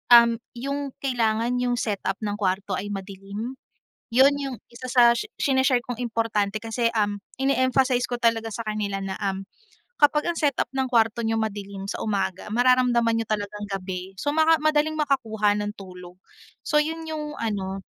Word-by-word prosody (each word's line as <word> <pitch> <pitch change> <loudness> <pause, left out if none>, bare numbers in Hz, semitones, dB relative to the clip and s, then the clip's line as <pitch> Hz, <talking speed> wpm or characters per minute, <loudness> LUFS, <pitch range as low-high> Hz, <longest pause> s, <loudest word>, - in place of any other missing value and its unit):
um, 235 0 +8 0.2
'yung 280 +2 -4
kailangan 235 -1 +1
'yung 245 -1 +1
setup 200 -4 -1
ng 205 0 -2
kwarto 195 0 -1
ay 190 +2 -2
madilim. 200 +5 -6 0.6
'Yun, 270 +2 +7
'yung 270 -3 -3 0.2
isa 250 +2 -8
sa 245 -1 +6
shi 235 - -1
sine-share 260 -2 +2
kong 245 -1 -6
importante 225 -4 -1
kasi, 230 +1 0
um, 205 -1 +1 0.2
ine-emphasize 260 -2 +2
ko 245 - -2
talaga 230 -2 +1
sa 230 - -4
kanila 205 -2 -2
na, 190 -1 -4
um, 195 -1 -2 0.5
kapag 300 +2 +3
ang 345 - 0
setup 290 -6 +1
ng 265 -1 -1
kwarto 230 0 +2
niyo 225 0 0
madilim 200 -2 -4
sa - - -4
umaga, 195 -1 -2
mararamdaman 245 -1 +3
ninyo 225 - 0
talagang 210 -1 -3
gabi, 185 -1 -4
so 290 +1 -1
maka 320 0 +5
madaling 310 0 +1
makakuha 220 -8 +1
ng 210 0 -2
tulog. 180 -1 -11 0.4
So 300 - -3
'yun 320 +2 +1
'yung 300 -1 -5
ano, 195 -3 -2
230 Hz, 165 wpm, -25 LUFS, 205-260 Hz, 0.6 s, um